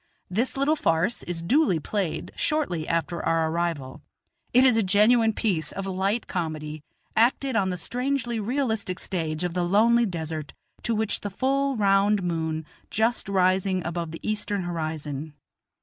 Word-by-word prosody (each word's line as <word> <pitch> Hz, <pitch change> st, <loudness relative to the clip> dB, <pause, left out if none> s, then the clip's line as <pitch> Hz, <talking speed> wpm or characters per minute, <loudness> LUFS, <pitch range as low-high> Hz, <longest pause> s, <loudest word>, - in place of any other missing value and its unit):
This 235 Hz, +8 st, 0 dB
little 280 Hz, +3 st, +3 dB
farce 185 Hz, -, +1 dB
is 170 Hz, -1 st, -4 dB
duly 250 Hz, -, +3 dB
played 190 Hz, +1 st, -3 dB
shortly 185 Hz, -, -1 dB
after 165 Hz, 0 st, -1 dB
our 165 Hz, -1 st, +1 dB
arrival; 165 Hz, -6 st, -2 dB, 0.5 s
it 250 Hz, +2 st, +6 dB
is 255 Hz, -3 st, +5 dB
a 225 Hz, -, +3 dB
genuine 220 Hz, +4 st, +4 dB
piece 185 Hz, -8 st, -1 dB
of 195 Hz, -, -5 dB
light 195 Hz, +4 st, 0 dB
comedy, 155 Hz, -4 st, -4 dB, 0.3 s
acted 255 Hz, +3 st, +2 dB
on 195 Hz, -4 st, +2 dB
the 180 Hz, -, -2 dB
strangely 250 Hz, +1 st, -1 dB
realistic 220 Hz, -5 st, -1 dB
stage 160 Hz, -4 st, -2 dB
of 175 Hz, -1 st, -1 dB
the 180 Hz, -, 0 dB
lonely 225 Hz, +6 st, +4 dB
desert, 160 Hz, -4 st, -5 dB, 0.3 s
to 230 Hz, -, 0 dB
which 220 Hz, 0 st, 0 dB
the 205 Hz, -, -3 dB
full 275 Hz, +6 st, 0 dB
round 200 Hz, -1 st, +3 dB
moon 160 Hz, -2 st, -2 dB, 0.2 s
just 225 Hz, 0 st, 0 dB
rising 185 Hz, -1 st, +2 dB
above 170 Hz, 0 st, -3 dB
the 165 Hz, -, -7 dB
eastern 205 Hz, -2 st, -1 dB
horizon. 155 Hz, -3 st, -4 dB
190 Hz, 150 wpm, -26 LUFS, 165-225 Hz, 0.5 s, it